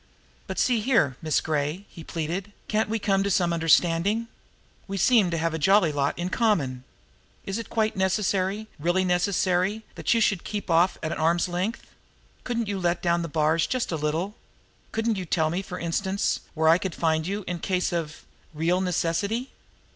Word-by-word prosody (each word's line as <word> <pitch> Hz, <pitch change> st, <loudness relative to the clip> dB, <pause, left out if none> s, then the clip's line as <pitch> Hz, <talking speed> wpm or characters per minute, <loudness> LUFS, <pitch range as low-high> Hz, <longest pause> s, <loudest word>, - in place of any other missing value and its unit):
"But, -, -, -5 dB
see 245 Hz, -3 st, +2 dB
here, 210 Hz, -, +2 dB
Miss 155 Hz, -1 st, +1 dB
Gray!" 155 Hz, +5 st, -2 dB
he 165 Hz, -, -11 dB
pleaded. 175 Hz, +5 st, -4 dB, 0.2 s
"Can't 215 Hz, 0 st, 0 dB
we 225 Hz, -, 0 dB
come 195 Hz, -2 st, +1 dB
to 200 Hz, -, 0 dB
some 175 Hz, -2 st, +2 dB
understanding? 170 Hz, +7 st, +2 dB, 0.6 s
We 195 Hz, 0 st, -4 dB
seem 215 Hz, -1 st, +4 dB
to 170 Hz, -, -1 dB
have 165 Hz, 0 st, 0 dB
a 160 Hz, -, -2 dB
jolly 195 Hz, 0 st, +4 dB
lot 140 Hz, -1 st, -1 dB
in 175 Hz, +1 st, -2 dB
common. 150 Hz, -, 0 dB, 0.6 s
Is 195 Hz, +3 st, -3 dB
it 230 Hz, -, -7 dB
quite 220 Hz, -1 st, 0 dB
necessary, 190 Hz, +1 st, 0 dB
really 175 Hz, +4 st, +1 dB
necessary, 185 Hz, +3 st, +1 dB
that -, -, -2 dB
you -, -, +3 dB
should 200 Hz, -5 st, +2 dB
keep 205 Hz, -3 st, -5 dB
me -, -, +3 dB
off 175 Hz, +3 st, +3 dB
at 155 Hz, +1 st, -2 dB
arm's 165 Hz, +2 st, +2 dB
length? 180 Hz, +6 st, -3 dB, 0.6 s
Couldn't 235 Hz, -2 st, -2 dB
you 200 Hz, -1 st, -2 dB
let 175 Hz, -1 st, 0 dB
down 170 Hz, -1 st, +2 dB
the 170 Hz, -, -3 dB
bars 155 Hz, +1 st, +1 dB
just 255 Hz, -6 st, -1 dB
a -, -, 0 dB
little? 160 Hz, +6 st, -1 dB, 0.6 s
Couldn't 225 Hz, -1 st, 0 dB
you 185 Hz, -, -4 dB
tell 160 Hz, -1 st, +1 dB
me, 180 Hz, +3 st, -1 dB
for 180 Hz, -2 st, -7 dB
instance, 190 Hz, +4 st, -1 dB, 0.2 s
where 160 Hz, 0 st, +2 dB
I 165 Hz, +2 st, +6 dB
could 185 Hz, -4 st, -4 dB
find 160 Hz, -1 st, +1 dB
you 200 Hz, +2 st, -3 dB
in 180 Hz, -1 st, -3 dB
case 185 Hz, -1 st, -1 dB
of 160 Hz, -2 st, -4 dB, 0.3 s
real 170 Hz, +4 st, +1 dB
necessity?" 190 Hz, +7 st, -1 dB
180 Hz, 185 wpm, -26 LUFS, 165-205 Hz, 0.6 s, I